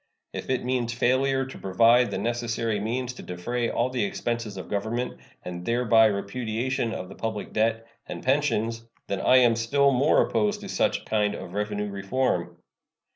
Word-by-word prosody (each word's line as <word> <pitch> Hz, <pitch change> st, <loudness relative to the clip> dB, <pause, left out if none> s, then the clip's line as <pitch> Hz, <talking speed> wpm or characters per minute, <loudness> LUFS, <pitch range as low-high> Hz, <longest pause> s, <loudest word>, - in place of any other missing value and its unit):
If -, -, -6 dB
it 130 Hz, -1 st, 0 dB
means 125 Hz, -2 st, 0 dB
failure 130 Hz, +2 st, +2 dB
to 130 Hz, -, -10 dB
provide 115 Hz, +6 st, +4 dB
the -, -, -3 dB
necessary 115 Hz, -2 st, -1 dB
means 120 Hz, +4 st, -2 dB
to -, -, -10 dB
defray 115 Hz, +7 st, -3 dB
all 125 Hz, +2 st, 0 dB
the 130 Hz, -, 0 dB
expenses 120 Hz, -, -3 dB
of 95 Hz, -, -7 dB
Government, 110 Hz, +5 st, -3 dB, 0.2 s
and 90 Hz, -1 st, -6 dB
thereby 115 Hz, +1 st, +4 dB
repudiation 115 Hz, +4 st, -2 dB
of 90 Hz, -, -5 dB
the 95 Hz, -, -10 dB
public 110 Hz, -1 st, -4 dB
debt 115 Hz, +1 st, +1 dB, 0.2 s
and -, -, -7 dB
pensions, 115 Hz, -5 st, +1 dB, 0.2 s
then 100 Hz, -1 st, -3 dB
I 130 Hz, -, +5 dB
am 120 Hz, -2 st, +5 dB
still 140 Hz, +5 st, +3 dB
more 135 Hz, +4 st, +3 dB
opposed 210 Hz, 0 st, 0 dB
to 200 Hz, -, -8 dB
such -, -, 0 dB
kind 105 Hz, -1 st, +1 dB
of 90 Hz, -, -8 dB
revenue 105 Hz, 0 st, -2 dB
reform. 100 Hz, +7 st, -1 dB
115 Hz, 170 wpm, -26 LUFS, 105-130 Hz, 0.2 s, I